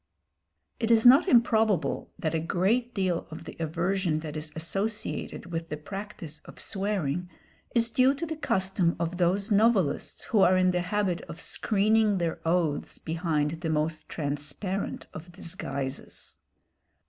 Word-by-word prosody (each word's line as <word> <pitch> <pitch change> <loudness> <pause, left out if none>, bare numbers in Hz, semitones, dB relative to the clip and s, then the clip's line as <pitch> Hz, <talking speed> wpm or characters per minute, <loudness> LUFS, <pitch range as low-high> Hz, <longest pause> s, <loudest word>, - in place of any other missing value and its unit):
It 230 - 0
is 225 0 +5
not 270 +9 +8
improbable 225 - +3
that 165 -5 -2
a 165 - +1
great 195 +9 +1
deal 185 -4 0
of 160 +1 -8
the - - -9
aversion 170 0 0
that 155 -1 -6
is 155 0 -5
associated 195 +2 -2
with 165 0 -3
the 150 - -3
practice 190 -2 -7
of - - -12
swearing 180 -4 -1 0.5
is 230 0 +2
due 260 +4 +4
to 335 - -3
the 320 0 -4
custom 190 - +1
of 170 +1 -2
those 190 +4 +1
novelists 205 -8 +2
who 220 - +1
are 185 -1 +6
in 185 0 +4
the 180 0 0
habit 185 -1 0
of 165 - -7
screening 215 +1 +2
their 170 -2 -1
oaths 165 -4 +1
behind 160 -1 -1
the 165 - -2
most 155 +1 -1
transparent 150 +6 -3
of 170 +3 -9
disguises. 140 -6 -5
180 Hz, 150 wpm, -28 LUFS, 160-210 Hz, 0.5 s, not